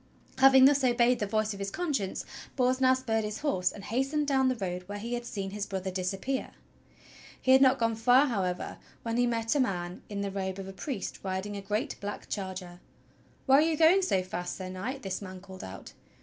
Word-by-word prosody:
Having 265 0 +8
thus 285 0 +5
obeyed 245 0 +3
the 210 - -1
voice 215 0 0
of 200 - -9
his 195 0 -2
conscience, 275 - -2 0.3
Bors 255 0 +2
now 260 0 +5
spurred 225 -4 -1
his 210 0 -4
horse 185 -12 +1
and 200 - -10
hastened 270 +7 0
down 265 -2 +2
the 255 - +1
road 180 -5 -3
where 205 0 -5
he 230 +4 -5
had 240 0 -3
seen 195 -4 -4
his 205 0 -4
brother 190 -1 -3
disappear. 195 +8 -3 0.9
He 260 - +2
had 265 +1 +7
not 265 0 +6
gone 230 -2 +1
far, 245 +5 +5
however, 190 -8 -2 0.2
when 230 0 -2
he 245 0 +3
met 230 -1 0
a 295 - +1
man 180 -7 -1
in 200 -1 -3
the 200 -1 -2
robe 190 -1 -3
of 195 -1 -6
a 195 - -7
priest 245 +1 -5
riding 190 +2 -3
a 200 - -5
great 215 +8 -2
black 205 0 -5
charger. 185 -3 -5 0.7
"Where 270 0 +6
are - - +5
you 320 0 +1
going 330 +5 +6
so 195 - +1
fast. 180 -1 -4
Sir 185 -1 -6
Knight.?" 230 +9 -5
this 190 0 -3
man 185 -1 -8
called 190 0 -11
out. 95 0 -9
215 Hz, 220 wpm, -29 LUFS, 190-260 Hz, 0.9 s, Having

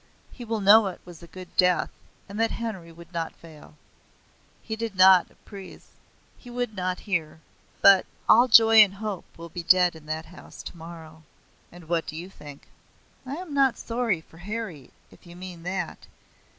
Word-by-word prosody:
He 245 - -10
will 225 -2 -3
know 205 +2 +7
it 185 - -6
was 175 -1 -13
a 170 - -12
good 180 +1 -12
death 180 -1 +3 0.4
and 200 +2 -7
that 225 0 +2
Harry 190 -8 -6
would 170 +1 -15
not 165 -1 -4
fail. 155 -2 -15 0.9
He 220 - -4
did 225 -2 -5
not 185 -1 +6
at - - -26
Ypres. 195 -3 -12 0.5
He 245 - -13
would 245 -2 -4
not 185 -1 -3
here. 170 -6 -3 0.4
But 195 -2 +7 0.2
all 240 +3 +6
joy 225 -1 +7
and 205 -3 +7
hope 205 -3 -5
will 170 0 -9
be 175 - -6
dead 180 0 +4
in 155 -1 -14
that 160 +1 -4
house 180 +3 -13
tomorrow." 160 -1 -11 0.5
"And 175 -2 -14
what 165 -1 -1
do - - -6
you 175 +4 -8
think?" 145 -5 -13 0.6
"I 270 - -4
am 340 -2 -8
not 270 -3 +3
sorry 230 -7 -2
for 165 +1 -19
Harry, 200 - -6 0.2
if - - -19
you 170 - -12
mean 180 -1 -9
that. 180 -1 -5
185 Hz, 180 wpm, -25 LUFS, 170-220 Hz, 0.9 s, know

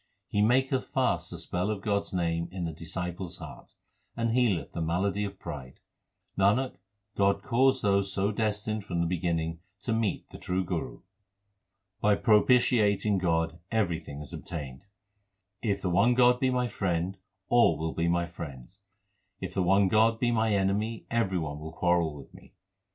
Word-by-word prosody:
He 105 -3 +1
maketh 130 +4 +2
fast - - 0
the - - -6
spell 90 +3 -2
of 105 -2 -3
God 100 -1 +2
s - - -10
name 85 -2 -1
in 90 -2 -4
the 80 - -2
disciples 85 +2 -5
heart, - - -11 0.4
and 115 -1 0
healeth 115 -8 +1
the 85 - -4
malady 95 +5 0
of 100 -1 -7
pride. 70 -6 -8 0.6
Nanak, 110 +7 +2 0.4
God 100 0 +2
caused 130 +2 +3
those 100 -1 +2
so 100 +1 0
destined 105 0 -1
from 90 -4 -3
the 85 - +2
beginning 85 -2 -1 0.2
to 115 - -1
meet 110 -2 -1
the - - -10
true 90 +1 -1
Guru. 85 -2 -4 1.0
By 105 -2 +4
propitiating 105 -2 +3
God 80 -1 0
everything 85 -9 -1
is 75 - -10
obtained: 70 -2 -7 0.8
If 100 -4 -1
the 90 - 0
one 105 +8 +4
God 125 0 +5
be 130 - +2
my 125 -1 +1
friend, 90 -4 -1 0.3
all 120 -10 +4
will 80 +1 -3
be 85 0 0
my 85 0 +2
friends; 85 0 -9 0.6
if - - -5
the 95 - 0
one 95 +2 +4
God 110 +3 +3
be 120 -1 +2
my 110 -1 +2
enemy 100 +3 0
every 115 -5 +1
one 75 -3 -3
will 80 +1 -8
quarrel 85 -3 +1
with 70 -2 -12
me. - - -16
95 Hz, 165 wpm, -29 LUFS, 85-110 Hz, 1.0 s, God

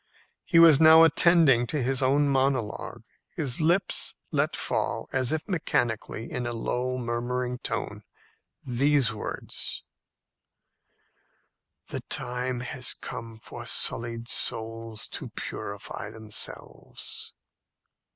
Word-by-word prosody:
He 170 - +1
was 165 -4 +8
now 160 0 +9
attending 160 -6 +5
to 150 - -2
his 130 +1 0
own 140 +2 +3
monologue. 135 -5 -1 0.3
His 140 -2 -3
lips 175 +4 +2 0.2
let - - +1
fall, - - -2
as 130 -1 +1
if 160 0 -2
mechanically, 120 - -1
in 125 -1 -3
a 120 - -2
low 125 +2 -2
murmuring 125 +1 -2
tone, - - -4 0.6
these 135 0 +2
words, 105 - -4 2.1
"The - - -4
time 125 0 -2
has 125 +1 -2
come 115 -3 -7
for 110 - -9
sullied 115 0 0
souls 115 -2 -1
to - - -5
purify 100 0 -6
themselves." 110 -1 -5
125 Hz, 105 wpm, -27 LUFS, 115-145 Hz, 2.1 s, now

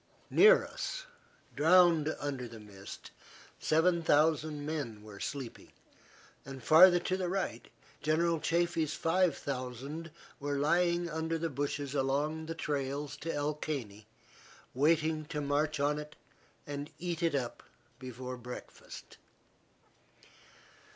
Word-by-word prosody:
Near 445 +4 +7
us, - - -5 0.5
drowned 165 -1 +5
under 135 -4 -3
the 115 -1 -11
mist, 100 -2 -11 0.5
seven 170 +2 +3
thousand 155 -1 +2
men 140 -9 -4
were 105 -2 -11
sleeping, 135 -5 -6 0.7
and, 135 -2 -9
farther 175 +5 +8
to 185 - 0
the 185 -2 -2
right, 195 +1 -3 0.3
General 165 +2 +2
Chaffee's 165 -2 0
five 175 -1 +2
thousand 135 +5 -5 0.3
were 145 0 -2
lying 170 +4 +2
under 160 0 -2
the 165 0 -2
bushes 140 0 -3
along 145 +3 0
the 165 - -4
trails 145 -1 -3
to 165 +3 -4
El 145 0 -1
Caney, 115 -9 -5 0.7
waiting 155 +3 +2
to 150 -1 -4
march 145 +1 0
on 145 +1 +1
it 150 0 -9 0.5
and 145 +1 -5
eat 175 -1 -3
it 165 -3 +1
up 125 -4 -3 0.4
before 125 0 -6
breakfast. 125 0 -10
150 Hz, 120 wpm, -32 LUFS, 140-165 Hz, 0.7 s, farther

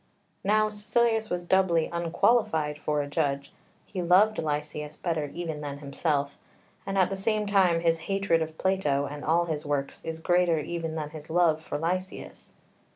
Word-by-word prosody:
Now 215 +2 +3
Caecilius 220 +1 0
was 180 0 -2
doubly 175 -2 +3
unqualified 170 -2 +1
for 150 -1 0
a - - -6
judge: 140 -2 -1 0.3
he 185 - -5
loved 190 +5 +4
Lysias 150 0 -3
better 160 -4 -1
even 165 -3 -5
than 145 -1 -5
himself, 140 0 -2 0.5
and 195 0 -2
at 190 0 +3
the - - -1
same 210 +2 0
time 190 -4 +3
his 165 -1 +2
hatred 195 -4 +2
of 160 0 -4
Plato 170 -8 +1
and 145 +1 -7
all 170 +2 +2
his 155 -3 -3
works 145 -2 -3
is 160 0 -4
greater 175 0 +2
even 165 +1 -3
than 150 -2 -4
his 155 -1 -10
love 160 -2 +3
for - - -4
Lysias. 185 +4 -4
165 Hz, 165 wpm, -27 LUFS, 150-190 Hz, 0.5 s, loved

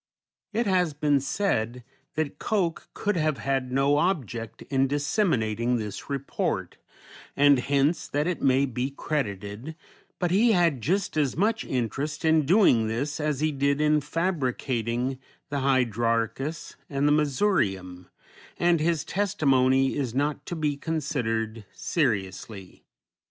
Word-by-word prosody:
It 230 +3 0
has 180 -6 +1
been 145 -1 +2
said 125 - -1 0.3
that 155 -2 -2
Koch 180 -6 -1
could 205 -1 -1
have 155 -3 +1
had 135 -2 -1
no 135 +2 +3
object 130 - -2
in 135 0 +1
disseminating 125 - 0
this 105 -3 -6
report, 140 -1 -2 0.6
and 145 -1 +6
hence 140 +5 +1
that 145 +1 -1
it 180 -1 -2
may 135 +1 +3
be 125 0 -2
credited, 120 -2 -4 0.4
but 175 -2 -1
he 220 +5 +4
had 170 - +2
just 180 - 0
as 145 -3 +1
much 220 +4 +1
interest 140 +6 -3
in 160 -3 +3
doing 160 - +5
this 140 +8 -2
as 150 -2 -1
he 155 0 +2
did 140 0 +1
in 150 0 +3
fabricating 130 - -1 0.3
the 140 0 -1
Hydrarchus 120 +2 0
and 140 0 +1
the - - +4
Missourium, 110 - 0 0.5
and 175 -1 +3
his 160 0 0
testimony 135 -9 +2
is 130 -4 -2
not 145 +2 -1
to 175 - -3
be 150 -3 -1
considered 120 -9 -2
seriously. 100 - -3
140 Hz, 130 wpm, -26 LUFS, 125-160 Hz, 0.6 s, and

